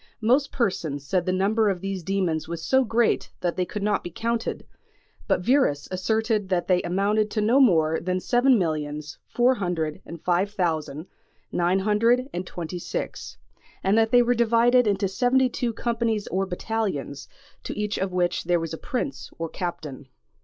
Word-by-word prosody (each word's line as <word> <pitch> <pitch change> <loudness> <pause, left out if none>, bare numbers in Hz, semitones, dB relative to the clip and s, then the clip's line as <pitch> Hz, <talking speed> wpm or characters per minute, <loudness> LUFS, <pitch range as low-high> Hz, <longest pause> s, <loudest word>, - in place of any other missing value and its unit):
Most 260 +6 +2
persons 160 - -2
said 180 +3 0
the - - +2
number 205 +4 +2
of 190 -2 -1
these 195 0 -4
demons 175 -3 -1
was 165 -1 -5
so 265 0 +4
great 230 0 +1
that 175 -1 -1
they 185 - 0
could 205 +2 -5
not 205 -1 +1
be - - -5
counted, 230 +6 -3 0.6
but - - +1
Wierus 250 - +2
asserted 215 +2 0
that 180 -2 0
they 180 -1 +3
amounted 200 +4 +1
to 215 - -2
no 225 +6 +3
more 160 - +4
than 185 +1 -1
seven 245 +5 +3
millions 150 -4 -3
four 245 +2 +3
hundred 175 -8 -3
and 170 - -9
five 180 +4 +1
thousand 160 -4 -2 0.5
nine 175 +2 +1
hundred 230 +5 +2
and 180 +1 -4
twenty 175 +1 -6
six; 170 - -5 0.5
and 195 +2 +3
that 225 0 +3
they 245 +1 +5
were 245 +1 +2
divided 235 +1 +4
into 200 -1 +1
seventy 250 +5 +2
two 245 -1 -2
companies 230 -2 -1
or 190 +1 -1
battalions, 185 -7 -3 0.4
to - - -6
each 210 0 -2
of 195 0 -1
which 180 -2 0
there 175 0 +2
was 165 -1 -4
a 160 - -6
prince 270 +2 -4
or 165 0 -4
captain. 155 -6 -6
195 Hz, 175 wpm, -25 LUFS, 175-230 Hz, 0.6 s, they